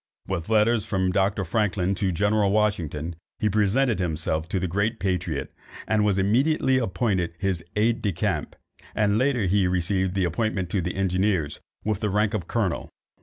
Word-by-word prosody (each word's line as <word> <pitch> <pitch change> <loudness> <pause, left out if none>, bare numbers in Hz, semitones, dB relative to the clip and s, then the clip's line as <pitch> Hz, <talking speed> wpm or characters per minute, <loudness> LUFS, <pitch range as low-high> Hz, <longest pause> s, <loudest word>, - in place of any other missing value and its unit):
With 90 -1 -3
letters 110 0 +3
from 95 -1 0
Dr. 95 +1 +1
Franklin 100 0 0
to 95 -1 0
General 105 +3 +2
Washington, 85 -7 0 0.2
he 105 - +1
presented 110 +4 +2
himself 80 -2 -1
to 95 - 0
the 95 - -1
great 100 +6 -1
patriot, 90 -6 -2 0.3
and 110 -1 +2
was 100 -2 +2
immediately 130 +7 +2
appointed 95 -6 -1
his 95 -2 -1
aid 110 +2 +2
de 100 - 0
camp, 95 -7 -2 0.4
and 105 0 +2
later 130 -3 +2
he 95 0 +2
received 95 +1 0
the 95 -2 +2
appointment 95 0 -1
to 100 - +1
the 90 +1 -3
engineers, 95 -4 0 0.3
with 105 -3 0
the 105 - -1
rank 105 +1 +1
of 95 -6 -3
colonel. 105 -8 -1
100 Hz, 170 wpm, -25 LUFS, 90-105 Hz, 0.4 s, letters